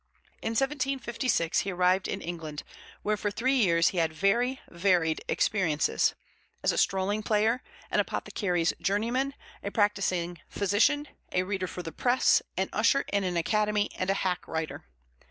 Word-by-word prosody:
In 225 Hz, -, -2 dB
1756 255 Hz, -, 0 dB
he 195 Hz, -, -1 dB
arrived 180 Hz, +1 st, +2 dB
in 195 Hz, -, -3 dB
England, 160 Hz, -3 st, -6 dB, 0.4 s
where 210 Hz, 0 st, +1 dB
for 205 Hz, 0 st, -2 dB
three 250 Hz, +6 st, 0 dB
years 170 Hz, -10 st, +4 dB
he 180 Hz, -, -2 dB
had 165 Hz, -1 st, +2 dB
very 235 Hz, +10 st, +1 dB
varied 170 Hz, -3 st, +1 dB
experiences 165 Hz, -8 st, +1 dB, 0.5 s
as -, -, +3 dB
a -, -, -3 dB
strolling 195 Hz, +2 st, +1 dB
player, 220 Hz, +3 st, +2 dB, 0.3 s
an -, -, +2 dB
apothecary's 175 Hz, -5 st, 0 dB
journeyman, 240 Hz, +7 st, 0 dB, 0.3 s
a 200 Hz, -, -3 dB
practising 190 Hz, -5 st, 0 dB
physician, 230 Hz, +10 st, +2 dB, 0.2 s
a 180 Hz, -, +1 dB
reader 190 Hz, -1 st, -2 dB
for 180 Hz, -, -6 dB
the 165 Hz, -, -6 dB
press, 250 Hz, +7 st, +3 dB, 0.2 s
an 190 Hz, 0 st, +1 dB
usher 230 Hz, +6 st, +3 dB
in 200 Hz, -1 st, +2 dB
an 180 Hz, -2 st, -1 dB
academy, 210 Hz, +4 st, +1 dB
and 185 Hz, -, -2 dB
a 195 Hz, -, +3 dB
hack 185 Hz, -3 st, -1 dB
writer. 160 Hz, -, -4 dB
200 Hz, 155 wpm, -28 LUFS, 175-225 Hz, 0.5 s, years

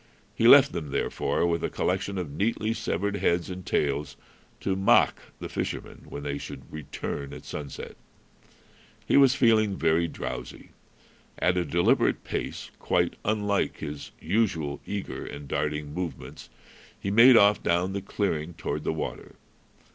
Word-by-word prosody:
He 115 Hz, -, +3 dB
left 140 Hz, +2 st, +8 dB
them, 75 Hz, -3 st, -5 dB
therefore, -, -, 0 dB
with 85 Hz, -1 st, 0 dB
a -, -, 0 dB
collection 95 Hz, +2 st, -1 dB
of 85 Hz, -6 st, -4 dB
neatly 110 Hz, +6 st, 0 dB
severed 100 Hz, -1 st, -2 dB
heads 85 Hz, -1 st, 0 dB
and 90 Hz, 0 st, -7 dB
tails, 75 Hz, -2 st, -1 dB, 0.4 s
to 95 Hz, -, 0 dB
mock 95 Hz, +1 st, +4 dB, 0.2 s
the -, -, -5 dB
fishermen -, -, -5 dB
when 70 Hz, -, -7 dB
they 70 Hz, 0 st, -3 dB
should -, -, -8 dB
return 70 Hz, -1 st, -5 dB
at -, -, -10 dB
sunset. 70 Hz, -2 st, -7 dB, 1.1 s
He -, -, +2 dB
was 135 Hz, -2 st, +6 dB
feeling 110 Hz, -6 st, +3 dB
very 80 Hz, +1 st, +2 dB
drowsy. 60 Hz, -5 st, -7 dB, 0.7 s
At 90 Hz, -, +2 dB
a 90 Hz, -, +1 dB
deliberate 85 Hz, +3 st, +2 dB
pace, -, -, -5 dB
quite -, -, +1 dB
unlike 105 Hz, -2 st, 0 dB
his 75 Hz, -2 st, -6 dB
usual 80 Hz, -7 st, 0 dB
eager 100 Hz, -1 st, -4 dB
and 70 Hz, 0 st, -8 dB
darting 75 Hz, +1 st, -2 dB
movements, 85 Hz, -5 st, -6 dB, 0.5 s
he 100 Hz, -, -3 dB
made 115 Hz, +4 st, +8 dB
off 100 Hz, 0 st, +5 dB
down 90 Hz, +3 st, +1 dB
the 100 Hz, -, -2 dB
clearing 85 Hz, -5 st, -2 dB
toward -, -, -4 dB
the -, -, 0 dB
water. -, -, -6 dB
90 Hz, 145 wpm, -27 LUFS, 75-100 Hz, 1.1 s, left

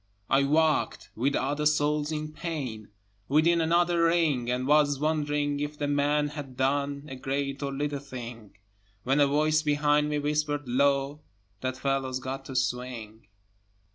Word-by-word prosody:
I 140 Hz, +1 st, +4 dB
walked, 155 Hz, +2 st, +1 dB
with 135 Hz, +5 st, 0 dB
other 145 Hz, +3 st, 0 dB
souls 150 Hz, 0 st, +1 dB
in 155 Hz, 0 st, -4 dB
pain, 135 Hz, -11 st, -5 dB, 0.4 s
Within 165 Hz, +4 st, +3 dB
another 170 Hz, +1 st, +3 dB
ring, 160 Hz, -8 st, +2 dB
And 125 Hz, +1 st, -1 dB
was 145 Hz, -1 st, +3 dB
wondering 145 Hz, -1 st, 0 dB
if 145 Hz, +1 st, -4 dB
the 145 Hz, -, -2 dB
man 145 Hz, +1 st, +1 dB
had 145 Hz, -4 st, -8 dB
done 140 Hz, +2 st, 0 dB
A 135 Hz, -, -7 dB
great 140 Hz, +1 st, -3 dB
or 140 Hz, -1 st, -2 dB
little 145 Hz, +1 st, -2 dB
thing, 120 Hz, -6 st, -9 dB, 0.5 s
When 135 Hz, +3 st, +2 dB
a 145 Hz, -, +5 dB
voice 155 Hz, +2 st, +2 dB
behind 150 Hz, 0 st, +2 dB
me 150 Hz, -, 0 dB
whispered 145 Hz, -1 st, -1 dB
low, 140 Hz, +3 st, +1 dB, 0.4 s
"That 130 Hz, 0 st, -3 dB
fellow's 135 Hz, -1 st, -1 dB
got 130 Hz, +1 st, -5 dB
to 135 Hz, -, -8 dB
swing." 120 Hz, -4 st, -3 dB
145 Hz, 150 wpm, -28 LUFS, 135-150 Hz, 0.5 s, a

